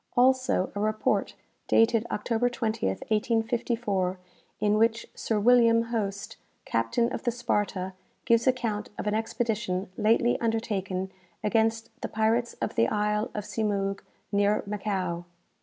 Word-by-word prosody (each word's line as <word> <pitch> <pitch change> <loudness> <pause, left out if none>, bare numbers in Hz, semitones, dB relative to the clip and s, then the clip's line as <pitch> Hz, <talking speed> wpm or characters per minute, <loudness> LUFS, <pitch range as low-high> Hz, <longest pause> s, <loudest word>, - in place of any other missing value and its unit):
Also 255 -6 +3
a 205 - -4
report 215 +1 0 0.3
dated 225 0 +3
October 230 +3 0
20th, 220 - -2
1854, 225 -4 0 0.4
in 210 0 +2
which 225 +1 +2
Sir 220 -2 -1
William 230 0 +4
Hoste, 200 -3 -3 0.3
captain 115 - +1
of - - -3
the 245 - 0
'Sparta,' 205 -5 -1 0.3
gives 235 +1 +3
account 230 -5 0
of - - -4
an 210 - 0
expedition 215 -4 -1
lately 230 +3 +3
undertaken 200 -5 -1 0.3
against 225 +1 +1
the - - -2
pirates 225 +2 +1
of - - -3
the 115 - +3
isle 210 - 0
of 210 - -2
Symoug, 200 -3 -1 0.3
near 205 +1 +2
Macao. 190 -4 -2
215 Hz, 125 wpm, -27 LUFS, 200-230 Hz, 0.4 s, William